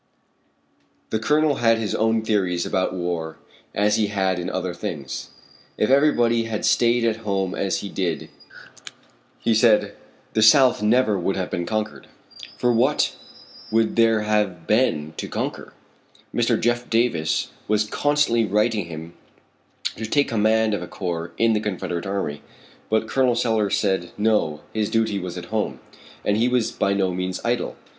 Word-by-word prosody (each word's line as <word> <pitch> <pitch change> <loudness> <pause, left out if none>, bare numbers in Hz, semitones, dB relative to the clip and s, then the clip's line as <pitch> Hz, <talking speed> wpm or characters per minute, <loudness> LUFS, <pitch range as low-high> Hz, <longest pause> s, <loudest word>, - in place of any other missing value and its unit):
The 110 - 0
Colonel 150 +5 +2
had 115 -1 +3
his 110 -2 -2
own 110 0 +1
theories 95 -6 0
about 95 0 -1
war 85 -3 -3 0.4
as 105 +1 +2
he 110 - +1
had 95 -3 0
in 90 - -3
other 95 -1 -3
things. 70 -6 -6 0.5
If 105 - +1
everybody 120 -5 +3
had 110 -2 -3
stayed 120 0 +3
at 110 -1 +1
home 100 -4 -2
as 95 - -1
he 100 - -6
did, 90 -5 -3 1.1
he 115 - +1
said, 110 -1 +3 0.4
the 110 - +2
South 125 +2 +6
never 110 -2 +3
would 95 +2 -1
have 95 - -3
been 85 0 -2
conquered. 110 0 -3 0.5
For 125 -1 +2
what 130 +6 +2 0.6
would 110 0 +2
there 115 -1 +4
have 105 -5 0
been 80 -10 +1
to - - -4
conquer? - - -4 0.6
Mr. 120 -1 +1
Jeff 120 +1 0
Davis 115 -9 +1 0.2
was 105 0 +2
constantly 145 0 +1
writing 105 0 +1
him 80 0 -8 0.8
to 110 - -4
take 145 +5 +2
command 110 -1 +2
of 105 - -2
a 90 - -6
corps 85 -3 -4
in 115 0 +3
the 105 - +1
confederate 95 -4 -3
army, 95 -7 -3 0.5
but 110 0 +1
Col. 130 0 +2
Sellers 110 -4 +1
said, 95 -4 -1
no, 105 -8 +1
his 110 -1 -1
duty 110 -3 0
was 90 -1 -6
at 90 +4 -8
home. 110 -1 -1 0.5
And 105 - +2
he 115 +2 +2
was 125 -2 +1
by 100 - 0
no 95 -2 0
means 90 0 -3
idle. 120 +1 -1
105 Hz, 160 wpm, -23 LUFS, 95-115 Hz, 1.1 s, South